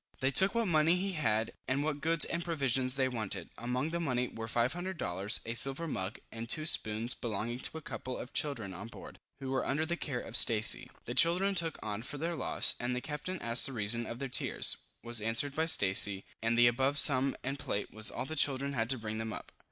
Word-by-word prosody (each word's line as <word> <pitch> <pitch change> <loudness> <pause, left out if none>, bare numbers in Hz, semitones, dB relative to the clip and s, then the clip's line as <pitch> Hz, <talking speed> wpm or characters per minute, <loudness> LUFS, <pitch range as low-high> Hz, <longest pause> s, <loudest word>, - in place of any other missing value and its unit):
They 130 +1 0
took 190 - +5
what 230 -2 0
money 160 0 +3
he 195 +2 -2
had, 110 - -1 0.2
and 135 +2 -1
what 150 -1 -3
goods 165 +1 +4
and 170 - -2
provisions 135 -6 0
they 135 -1 +1
wanted. 105 -7 -3
Among 125 +6 -3
the 170 - -2
money 125 -6 -2
were 115 0 -7
500 170 +12 -2
dollars, 95 - 0
a 115 - -4
silver 135 +7 +1
mug, 95 -7 -4
and 115 0 -8
two 155 +4 -1
spoons 115 -4 +1
belonging 120 +2 -4
to 160 - -3
a 160 - -10
couple 130 -2 -6
of 125 - -9
children 115 -10 -2
on 100 +5 -8
board, 115 - -12 0.2
who 135 -1 -6
were 135 - -1
under 150 +4 -1
the 170 +1 -2
care 140 -7 -4
of 115 - -8
Stacy. 110 -3 +5 0.2
The 120 - -5
children 175 +8 +3
took 165 -4 0
on 105 0 -4
for 140 +4 -7
their 165 +3 -3
loss, - - +1
and 125 +1 -2
the - - -2
captain 150 +7 -6
asked 115 +3 +6
the 135 - -7
reason 115 +1 0
of 115 - -6
their 135 +1 -5
tears, 125 - +1 0.3
was 120 -2 0
answered 115 +6 +1
by 160 +2 -1
Stacy, 100 -7 +4 0.2
and 115 +1 0
the 120 - +6
above 130 +4 +1
sum 135 -2 +5
and 135 +2 -4
plate 105 -7 -4
was 110 0 0
all - - -5
the 160 - -6
children 140 -1 +2
had 115 -3 -1
to 130 - +2
bring 110 -1 -5
them 110 0 -4
up. - - -8
130 Hz, 230 wpm, -31 LUFS, 115-155 Hz, 0.3 s, asked